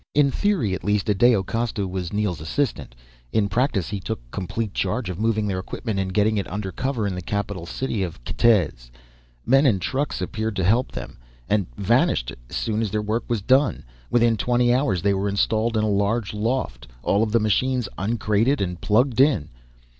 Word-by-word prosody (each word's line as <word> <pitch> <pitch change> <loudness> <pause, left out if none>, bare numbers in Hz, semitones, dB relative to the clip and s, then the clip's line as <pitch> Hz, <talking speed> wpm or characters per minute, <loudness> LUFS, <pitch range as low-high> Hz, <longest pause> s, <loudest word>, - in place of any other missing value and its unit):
In 145 -2 +4
theory 185 - +1
at 95 - -4
least, 105 -1 +1
Adao 105 -1 +4
Costa 115 -3 -2
was 90 -2 -4
Neel's 100 -6 -1
assistant. 105 - -2 0.4
In 105 -2 +2
practice 115 - 0
he 100 -1 -3
took - - -6
complete 105 +3 -3
charge 100 +1 -1
of 90 - -7
moving 110 -1 +1
their 95 -2 -1
equipment 100 +2 -4
and 95 -1 -2
getting 105 +3 +2
it 100 - -3
under 100 -1 -3
cover 130 -3 -2
in 100 - -1
the 90 - -4
capital 100 -2 -3
city 115 +2 -2
of 85 -10 -5
Kitezh. 85 - +2 0.6
Men 135 +3 +5
and 100 -7 +3
trucks 135 +10 -2
appeared 110 +3 -3
to 95 - 0
help 115 +8 +2
them, - - -7 0.3
and 105 -3 +1
vanished - - +1 0.2
as - - -7
soon 110 -1 -1
as 110 - 0
their 105 +2 -1
work 110 +3 -1
was 115 -5 -1
done. 130 +4 +3 0.3
Within 115 -1 +3
twenty 120 +2 +2
hours 125 -10 +1
they 100 0 +3
were 100 +1 0
installed 110 +3 +1
in 105 - +2
a - - +1
large 100 +2 0
loft, 115 +5 -2 0.2
all 100 - +2
of 110 -1 0
the 115 - +4
machines 120 +3 +1
uncrated 110 +5 +1
and 90 -2 -3
plugged 120 +4 +2
in. 130 - +3
105 Hz, 190 wpm, -23 LUFS, 95-120 Hz, 0.6 s, Men